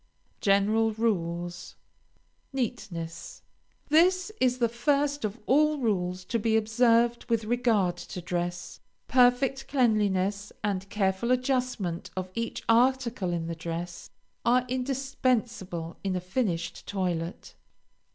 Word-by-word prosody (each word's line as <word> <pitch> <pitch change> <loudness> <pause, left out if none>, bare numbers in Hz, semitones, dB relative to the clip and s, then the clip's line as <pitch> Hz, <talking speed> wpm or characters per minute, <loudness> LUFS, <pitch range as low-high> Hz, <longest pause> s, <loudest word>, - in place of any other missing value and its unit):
GENERAL 215 +3 +3
RULES. 175 -6 -2 0.8
NEATNESS 175 -10 -4 0.5
This 365 +6 +4
is 255 -1 +3
the 240 -2 +2
first 285 +4 0
of 215 +1 -2
all 300 +3 +4
rules 185 -7 -1
to 230 - -1
be 220 0 +2
observed 230 +2 +2
with 230 -1 +1
regard 220 -6 +1
to - - -7
dress. 175 0 -4 0.3
Perfect 255 +2 +3
cleanliness 205 -6 +1
and 195 -2 -2
careful 195 +2 0
adjustment 255 -9 0
of 185 0 -3
each 230 +2 -3
article 240 -4 +2
in 170 -1 -2
the 165 - -3
dress 170 +1 -6 0.3
are 250 +1 +3
indispensable 245 -9 -1
in 190 -2 -1
a - - 0
finished 180 -2 -2
toilet. 180 -3 -3
220 Hz, 110 wpm, -28 LUFS, 180-250 Hz, 0.8 s, This